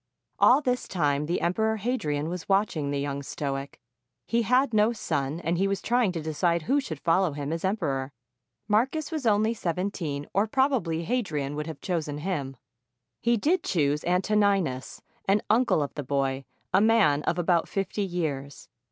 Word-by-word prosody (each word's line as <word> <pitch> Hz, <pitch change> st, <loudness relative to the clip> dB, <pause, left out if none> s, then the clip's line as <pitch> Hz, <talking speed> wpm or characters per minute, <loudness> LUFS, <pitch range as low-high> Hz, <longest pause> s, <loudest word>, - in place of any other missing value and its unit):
All 265 Hz, +4 st, +6 dB
this 250 Hz, -3 st, -1 dB
time 150 Hz, -4 st, 0 dB
the 175 Hz, -, -1 dB
Emperor 220 Hz, +5 st, +1 dB
Hadrian 160 Hz, -, -1 dB
was 175 Hz, +1 st, -6 dB
watching 195 Hz, -7 st, +1 dB
the 140 Hz, 0 st, -1 dB
young 140 Hz, 0 st, -3 dB
stoic. 140 Hz, 0 st, -4 dB, 0.5 s
He 235 Hz, 0 st, +1 dB
had 250 Hz, +3 st, +2 dB
no 215 Hz, +2 st, +4 dB
son, 150 Hz, -, -2 dB
and 170 Hz, +1 st, -1 dB
he 195 Hz, -, +2 dB
was 195 Hz, 0 st, -1 dB
trying 240 Hz, -4 st, +1 dB
to 165 Hz, -3 st, -4 dB
decide 160 Hz, +2 st, 0 dB
who 280 Hz, -, +2 dB
should 160 Hz, -, -6 dB
follow 170 Hz, 0 st, +2 dB
him 145 Hz, +1 st, -3 dB
as 165 Hz, -, -4 dB
emperor. 140 Hz, -9 st, -1 dB, 0.6 s
Marcus 265 Hz, +10 st, +1 dB
was 305 Hz, -7 st, -2 dB
only 215 Hz, +1 st, +3 dB
seventeen, 170 Hz, -7 st, -3 dB
or 200 Hz, +4 st, +2 dB
probably 220 Hz, -, +1 dB
Hadrian 160 Hz, -, -2 dB
would 150 Hz, +1 st, -4 dB
have 160 Hz, -3 st, -7 dB
chosen 160 Hz, -6 st, -2 dB
him. 150 Hz, -5 st, -3 dB, 0.7 s
He 235 Hz, 0 st, +2 dB
did 325 Hz, -, +2 dB
choose 150 Hz, -4 st, +1 dB
Antoninus, 185 Hz, -6 st, +1 dB, 0.2 s
an 200 Hz, +2 st, +2 dB
uncle 225 Hz, -9 st, +3 dB
of 140 Hz, -, -5 dB
the 145 Hz, -, -4 dB
boy, 135 Hz, 0 st, -1 dB, 0.3 s
a 195 Hz, -, +5 dB
man 210 Hz, -10 st, +4 dB
of 170 Hz, -, 0 dB
about 175 Hz, -1 st, +2 dB
fifty 195 Hz, +1 st, -2 dB
years. 155 Hz, -7 st, -3 dB
175 Hz, 170 wpm, -27 LUFS, 145-215 Hz, 0.7 s, All